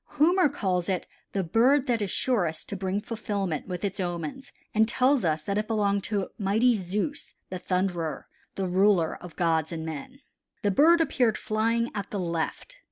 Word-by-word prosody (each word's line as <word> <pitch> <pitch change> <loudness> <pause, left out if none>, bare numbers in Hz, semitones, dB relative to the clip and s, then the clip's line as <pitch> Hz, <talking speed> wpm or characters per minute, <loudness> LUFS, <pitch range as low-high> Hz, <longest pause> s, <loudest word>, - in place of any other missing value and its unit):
Homer 345 +2 +5
calls 185 -9 -1
it 185 -2 -1 0.3
the 195 - -1
bird 255 - +3
that 240 -4 0
is 200 - -1
surest 180 -12 0
to - - -3
bring 190 +1 -2
fulfillment 200 -8 -3
with 180 +1 -3
its 200 0 -3
omens 175 - -4 0.2
and 220 0 +4
tells 255 +2 +3
us 155 -2 0
that 200 +5 -1
it 215 - -3
belonged 200 -3 +1
to 200 -3 -1
mighty 220 +5 +3
Zeus 210 - -3 0.2
the 185 - -4
thunderer, 180 -4 -1 0.3
the 195 - -1
ruler 185 -2 +3
of 180 -2 -10
gods 160 -2 +1
and 160 -1 -4
men. 160 - -7 0.4
The 205 - +3
bird 330 - +5
appeared 250 -8 +2
flying 230 +2 0
at 200 -2 -4
the 205 - -3
left. 170 - -3
200 Hz, 175 wpm, -27 LUFS, 180-230 Hz, 0.4 s, Homer